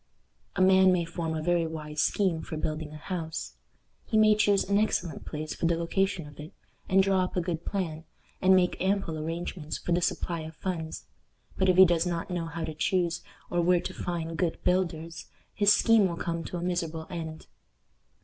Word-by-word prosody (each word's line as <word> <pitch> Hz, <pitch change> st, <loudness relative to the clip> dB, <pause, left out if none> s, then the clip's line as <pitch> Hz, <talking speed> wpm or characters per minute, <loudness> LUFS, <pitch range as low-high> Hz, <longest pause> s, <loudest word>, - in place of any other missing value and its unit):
A -, -, 0 dB
man 190 Hz, 0 st, +6 dB
may 175 Hz, -2 st, +1 dB
form 165 Hz, -1 st, -3 dB
a 155 Hz, -, -3 dB
very 175 Hz, -1 st, +2 dB
wise 150 Hz, -1 st, -4 dB
scheme 180 Hz, -4 st, +1 dB
for 160 Hz, -, -6 dB
building 155 Hz, 0 st, -3 dB
a 155 Hz, -, -8 dB
house. 160 Hz, 0 st, -5 dB, 0.5 s
He 220 Hz, -, +1 dB
may 215 Hz, 0 st, +6 dB
choose 205 Hz, -2 st, +3 dB
an 200 Hz, +1 st, +3 dB
excellent 175 Hz, -7 st, -1 dB
place 155 Hz, 0 st, -5 dB
for 165 Hz, -, -1 dB
the 170 Hz, 0 st, +1 dB
location 175 Hz, 0 st, 0 dB
of 145 Hz, -1 st, -14 dB
it, 155 Hz, +6 st, -9 dB, 0.4 s
and 190 Hz, +1 st, +5 dB
draw 190 Hz, -1 st, +2 dB
up 180 Hz, -, -4 dB
a -, -, +4 dB
good 170 Hz, -1 st, -3 dB
plan, 165 Hz, -5 st, -3 dB, 0.4 s
and 190 Hz, 0 st, +6 dB
make 180 Hz, -1 st, +2 dB
ample 190 Hz, -3 st, 0 dB
arrangements 165 Hz, 0 st, -4 dB
for -, -, -5 dB
the 175 Hz, +1 st, +3 dB
supply 170 Hz, 0 st, -1 dB
of 160 Hz, 0 st, -8 dB
funds, 165 Hz, -3 st, -4 dB, 0.5 s
but 190 Hz, -1 st, +2 dB
if 185 Hz, -, +3 dB
he 190 Hz, -, +10 dB
does 170 Hz, 0 st, +2 dB
not 170 Hz, +1 st, -3 dB
know 170 Hz, -2 st, -2 dB
how 165 Hz, +1 st, -5 dB
to 160 Hz, -, -4 dB
choose, 170 Hz, +1 st, 0 dB, 0.3 s
or 175 Hz, -, +2 dB
where 175 Hz, +1 st, +4 dB
to -, -, -5 dB
find 165 Hz, -2 st, -4 dB
good 175 Hz, -3 st, 0 dB
builders, 170 Hz, -3 st, -1 dB, 0.3 s
his 205 Hz, 0 st, +4 dB
scheme 220 Hz, -1 st, +5 dB
will 170 Hz, -2 st, -4 dB
come 170 Hz, -1 st, -3 dB
to 180 Hz, -, -5 dB
a 170 Hz, -, -4 dB
miserable 165 Hz, -3 st, -2 dB
end. 160 Hz, -2 st, -6 dB
170 Hz, 200 wpm, -28 LUFS, 160-185 Hz, 0.5 s, he